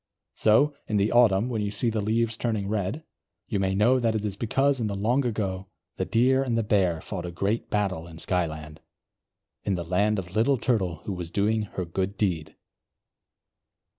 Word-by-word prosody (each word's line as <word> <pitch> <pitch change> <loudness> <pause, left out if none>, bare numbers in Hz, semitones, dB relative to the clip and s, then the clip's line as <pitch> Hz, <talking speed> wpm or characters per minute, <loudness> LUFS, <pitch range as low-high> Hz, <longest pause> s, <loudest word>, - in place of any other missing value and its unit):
So, 140 +8 +4
in 105 - 0
the 100 +2 +2
autumn, 115 -3 +4
when 115 -4 -2
you 105 - -1
see 110 +3 -1
the 110 -1 -1
leaves 115 +2 +1
turning 110 -4 -2
red, 105 - -2 0.4
you 105 - -1
may 95 0 0
know 120 +6 +4
that 115 -2 +1
it 105 -1 -1
is 100 -2 -3
because 135 +5 +1
in 115 - 0
the 100 - -3
long 120 +7 +1
ago, 100 -5 -2 0.3
the - - -1
Deer 130 +3 +3
and 125 -4 0
the 115 - +1
Bear 95 -6 +1
fought 90 -4 -5
a - - -5
great 100 +6 -1
battle 95 -5 -1
in 80 -1 -11
Skyland, 80 -3 -3 0.8
in 100 - 0
the 85 -1 -4
land 100 +5 +1
of 90 -1 -5
Little 125 +5 +3
Turtle 95 - -1
who 100 - -2
was 90 -2 -5
doing 105 +3 0
her 90 - -1
good 95 +4 -3
deed. 85 -7 -1
105 Hz, 195 wpm, -26 LUFS, 95-115 Hz, 0.8 s, So